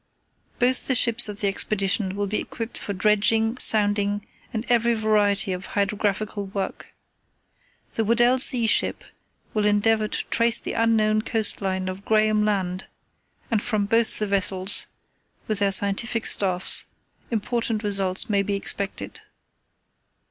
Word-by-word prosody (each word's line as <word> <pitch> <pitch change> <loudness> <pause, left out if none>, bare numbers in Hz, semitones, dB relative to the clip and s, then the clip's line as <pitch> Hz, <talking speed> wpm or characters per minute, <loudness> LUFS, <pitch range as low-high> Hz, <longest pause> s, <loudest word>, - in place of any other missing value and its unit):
"Both 250 +1 +2
the 260 - +3
ships 235 -2 +4
of 205 -1 -8
the 205 - +1
Expedition 195 0 0
will 205 0 -2
be 205 +2 -1
equipped 230 0 -7
for - - -5
dredging, 215 +4 +1
sounding, 205 -1 +1 0.3
and 225 -1 -4
every 235 -1 +2
variety 210 -2 +1
of 180 +2 -7
hydrographical 205 0 -2
work. 195 0 -6 1.0
The 225 - -1
Weddell 240 +3 +3
Sea 250 -2 +3
ship 220 - +1 0.5
will 210 -1 +1
endeavour 215 +1 +2
to - - -4
trace 230 0 +3
the - - -5
unknown 220 -2 +2
coast 220 -1 0
line 190 -1 -2
of 185 +1 -6
Graham 215 0 +2
Land, 190 -3 -2 0.6
and 220 -3 +1
from 215 -3 -1
both 225 +1 +2
the 210 - 0
vessels, 195 -1 +1 0.6
with 215 -2 +1
their 200 -1 +1
scientific 200 +4 0
staffs, 185 -2 +1 0.4
important 225 0 -2
results 195 -2 +1
may 200 -2 +1
be 200 0 -2
expected. 200 0 -4
210 Hz, 140 wpm, -23 LUFS, 200-225 Hz, 1.0 s, ships